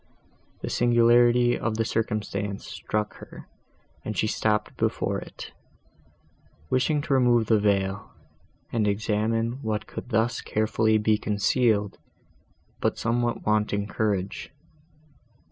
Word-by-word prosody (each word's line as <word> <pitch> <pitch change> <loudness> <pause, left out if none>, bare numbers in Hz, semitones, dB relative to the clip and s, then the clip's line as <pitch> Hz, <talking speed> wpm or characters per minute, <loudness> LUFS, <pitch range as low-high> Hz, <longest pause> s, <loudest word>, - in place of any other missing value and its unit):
The - - -3
singularity 120 0 +4
of 110 -1 -2
the 115 - +1
circumstance 105 -3 -2
struck 105 0 -3
her, - - -12 0.6
and 110 -2 -5
she - - +2
stopped 105 0 0
before - - -1
it, - - -10 1.2
wishing 145 +3 +1
to 140 - -1
remove 120 -3 +4
the 110 0 +3
veil, 100 -1 0 0.6
and 110 -3 +1
examine 110 +4 0
what 110 -2 -2
could - - -8
thus 115 0 +1
carefully 110 0 +1
be 105 0 +2
concealed, 105 0 +1 0.8
but - - 0
somewhat 120 +1 -1
wanting 105 -1 +1
courage. 100 -2 -2
110 Hz, 110 wpm, -26 LUFS, 105-120 Hz, 1.2 s, singularity